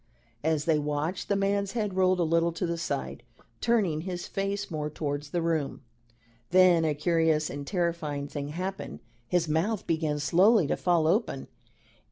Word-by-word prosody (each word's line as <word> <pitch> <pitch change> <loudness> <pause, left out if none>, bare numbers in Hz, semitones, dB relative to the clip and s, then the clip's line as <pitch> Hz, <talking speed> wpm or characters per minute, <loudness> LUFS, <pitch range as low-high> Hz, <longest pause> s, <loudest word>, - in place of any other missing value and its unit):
As 155 -1 +1
they 160 -3 +3
watched, 150 +5 -2
the 200 - +3
man's 200 0 0
head 210 -5 -1
rolled 185 -1 +3
a - - +3
little 165 +1 +2
to 170 +2 -2
the 170 0 -1
side, 70 - -4 0.4
turning 200 -10 +1
his 180 0 -5
face 200 0 -3
more 150 -1 -2
towards 145 -1 -4
the 170 +2 -1
room. 160 -5 -1 0.7
Then 180 -2 +5
a 155 -2 +1
curious 160 -1 +1
and 140 0 -6
terrifying 165 -6 -1
thing 145 0 -5
happened. 185 +6 -5 0.3
His 170 +5 +1
mouth 180 +7 0
began 160 -2 0
slowly 180 +6 +4
to - - 0
fall 175 -3 +2
open. 170 - 0
165 Hz, 165 wpm, -28 LUFS, 150-185 Hz, 0.7 s, Then